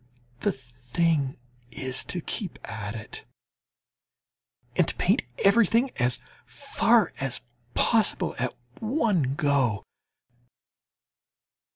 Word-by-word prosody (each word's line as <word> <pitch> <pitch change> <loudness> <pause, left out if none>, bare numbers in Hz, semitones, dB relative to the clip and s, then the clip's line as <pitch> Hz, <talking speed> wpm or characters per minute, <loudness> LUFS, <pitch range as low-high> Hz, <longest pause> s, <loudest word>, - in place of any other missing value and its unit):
The - - +1
thing 130 +4 -1 0.3
is 130 +2 -2
to 180 - -3
keep 190 +1 -3
at 105 -1 -5
it, 105 -1 -8 1.5
and - - +4
to - - -1
paint - - +3 0.2
everything 230 +5 +4
as 120 +1 +2 0.3
far 235 -5 +2
as 135 -2 -3 0.3
possible 225 -4 +3
at 125 0 -1 0.2
one 215 - +1
go! 140 - +1
140 Hz, 90 wpm, -27 LUFS, -, 1.5 s, and